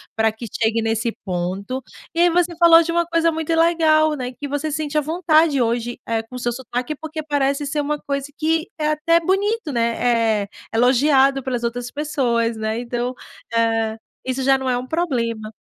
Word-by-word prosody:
para 220 0 +2
que 220 +2 -9 0.2
chegue 225 +1 +2
nesse 225 +1 0
ponto. 190 +8 -3 0.3
E 335 - +2
aí 350 - +6
você 345 0 +1
falou 335 -1 +7
de 335 - -3
uma 340 0 +2
coisa 335 0 +1
muito 320 +1 -2
legal, 320 -2 +3
né? 250 -3 -4
Que 290 - -4
você 290 +2 -2
sente 305 0 -2
à - - +4
vontade 315 -2 +2
hoje, 235 +1 -1
eh, 225 -1 -1
com 230 +3 -13
o - - -5
seu 240 -1 -1
sotaque, 250 +3 -4
porque 315 +1 -6
parece 285 -1 0
ser 295 +2 -1
uma 295 +1 -2
coisa 280 -1 -3
que 320 +1 +1
é 300 - 0
até 305 +2 +3
bonito, 390 0 0
né. 230 -2 +1
É - - -8 0.3
elogiado 270 +3 +3
pelas 245 -2 -3
outras 235 +1 -2
pessoas, 240 -6 0
né. 220 +1 -2
Então, 245 +1 -3 0.4
eh, 225 -1 +1 0.3
isso 260 +1 -2
já 270 +1 +5
não 265 -1 -3
é 250 - +1
um 250 - -4
problema. 235 -10 -2
270 Hz, 190 wpm, -21 LUFS, 235-315 Hz, 0.4 s, falou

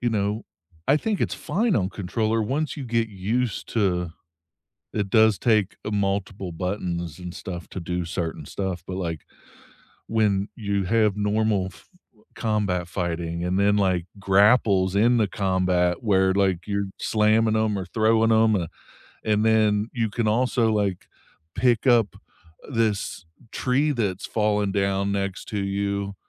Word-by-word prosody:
you 120 - +1
know, 105 0 -1 0.4
I 145 - +6
think 210 +5 -2
it's - - 0
fine 195 +7 0
on 95 -2 +1
controller 110 +3 -1
once 145 +7 -2
you 140 - -5
get 115 -1 0
used 110 +3 -2
to 90 -6 0 0.8
it 100 -2 -1
does 110 -1 +5
take 105 -4 +2
a 105 - -3
multiple 100 -2 -2
buttons 85 -2 -3
and 90 -1 -7
stuff 90 -3 -7
to - - -6
do 90 0 -3
certain 85 -1 -4
stuff, 95 -3 -4
but, 95 - -5
like, 85 -4 -3 0.9
when 105 -3 +1
you 100 -3 -1
have 105 +1 +2
normal 105 -1 +1
f - - -19 0.5
combat 100 -5 -1
fighting 85 -1 -3
and 90 +2 0
then, 100 +1 +3
like, 95 -3 +1 0.2
grapples 100 -1 +4
in 115 +5 +4
the 110 -3 +3
combat 90 -3 0
where, 95 -4 +3
like, 95 -3 +1
you're 100 -1 -1
slamming 110 +1 +2
'em 110 -2 +1
or 95 - -5
throwing 110 +3 +2
'em, 110 0 +4
uh, 85 - -1 0.6
and 105 0 +2
then 110 -1 +3
you 115 -3 -1
can 115 +1 -1
also, 115 0 +2
like, 100 -4 -1 0.5
pick 120 +2 +2
up 120 -5 +4 0.5
this 115 -9 -1 0.3
tree 140 +4 +1
that's 100 -8 -2
fallen 105 -2 0
down 100 0 0
next 100 -1 -3
to 105 -4 -3
you 100 0 -2
100 Hz, 150 wpm, -24 LUFS, 95-110 Hz, 0.9 s, I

